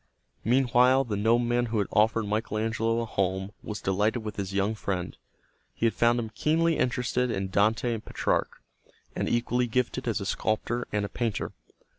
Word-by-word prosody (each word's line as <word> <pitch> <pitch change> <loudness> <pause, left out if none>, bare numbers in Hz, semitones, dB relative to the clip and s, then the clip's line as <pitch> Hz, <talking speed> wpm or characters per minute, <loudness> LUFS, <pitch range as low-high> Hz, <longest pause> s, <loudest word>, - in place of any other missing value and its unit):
Meanwhile 125 +2 +4
the 110 -5 -3
nobleman 120 +3 +2
who 110 0 -2
had 100 - +2
offered 110 +1 +3
Michael 105 +1 -2
Angelo 115 +1 0
a - - -2
home 95 -2 -1
was 105 -1 -6
delighted 105 +5 +1
with 105 -1 -6
his 100 -1 -3
young 100 +2 +1
friend. 95 -4 -3 0.6
He 115 - +2
found 120 +1 +3
him 110 -2 -4
keenly 160 +6 +1
interested 125 0 0
in 95 -3 -2
Dante 110 +5 +2
and 110 - -5
Petrarch, - - -1 0.5
and - - -1
equally 120 +1 +1
gifted 125 +2 -1
as 115 - 0
a 100 - -5
sculptor 110 +3 -1
and 105 -1 -2
painter. 115 -4 -2
115 Hz, 165 wpm, -27 LUFS, 105-120 Hz, 0.6 s, Meanwhile